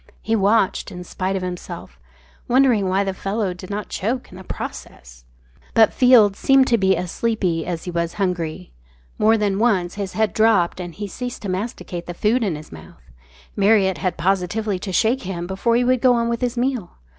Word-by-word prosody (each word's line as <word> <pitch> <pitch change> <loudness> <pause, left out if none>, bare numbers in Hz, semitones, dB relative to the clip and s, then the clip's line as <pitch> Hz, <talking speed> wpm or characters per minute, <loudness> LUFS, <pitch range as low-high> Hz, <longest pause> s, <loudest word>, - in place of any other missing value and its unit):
He 225 - +1
watched 205 -1 +1
in 180 -1 -7
spite 185 +2 -3
of 190 - -2
himself, 180 -1 -7 0.5
wondering 240 -6 +3
why 190 +2 +2
the 195 -1 -2
fellow 195 0 -2
did 180 +1 -11
not 205 0 -4
choke 245 +6 -3
in 180 - -11
the - - -10
process. - - -8 0.5
But 220 -2 +5
Field 240 -6 +5
seemed 270 +3 +4
to 235 - +4
be 190 -1 +3
as 175 0 -4
sleepy 185 -9 -1
as 170 -2 -3
he 180 - -5
was 170 0 -2
hungry. 170 - -3 0.5
More 220 +1 +4
than 205 -2 0
once 195 -7 +1
his 200 -2 -5
head 215 -4 0
dropped 215 -6 +3
and 175 -3 -6
he 205 +1 -5
ceased 245 +3 -6
to 200 - -3
masticate 185 -2 -4
the 175 - -6
food 225 +6 +1
in 190 -7 -1
his 150 +1 -10
mouth. 80 -6 -14 0.4
Marriott 200 -2 +3
had 180 -2 -2
positively 195 +3 0
to 190 - -5
shake 225 +8 +2
him 180 -2 -5
before 195 +6 0
he 245 - +3
would 250 0 +2
go 255 -2 +5
on 235 0 0
with 235 +1 -2
his 245 0 -1
meal. 245 -6 -1
195 Hz, 200 wpm, -21 LUFS, 180-225 Hz, 0.5 s, But